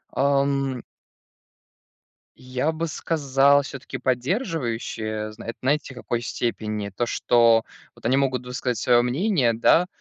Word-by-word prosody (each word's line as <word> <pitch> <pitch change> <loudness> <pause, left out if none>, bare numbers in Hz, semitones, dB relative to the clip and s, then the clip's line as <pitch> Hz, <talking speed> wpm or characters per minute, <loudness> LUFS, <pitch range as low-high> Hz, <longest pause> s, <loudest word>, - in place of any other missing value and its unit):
Ам. 140 -2 +1 1.5
Я 130 +4 -2
бы 165 +1 -3
сказал, 140 -2 +2
все-таки 135 -1 -7
поддерживающие, 120 - -2
зна 115 - -11
знаете, 140 +1 0
в 125 - -16
какой 120 0 -3
степени? 110 -3 -3
То, 100 +5 -2
что 115 -1 +3 0.3
вот - - -18
они 125 +3 +3
могут 130 -3 0
высказать 125 -1 -3
свое 120 +3 +4
мнение, 130 - +1
да, 165 +10 +4
130 Hz, 120 wpm, -24 LUFS, 120-140 Hz, 1.5 s, свое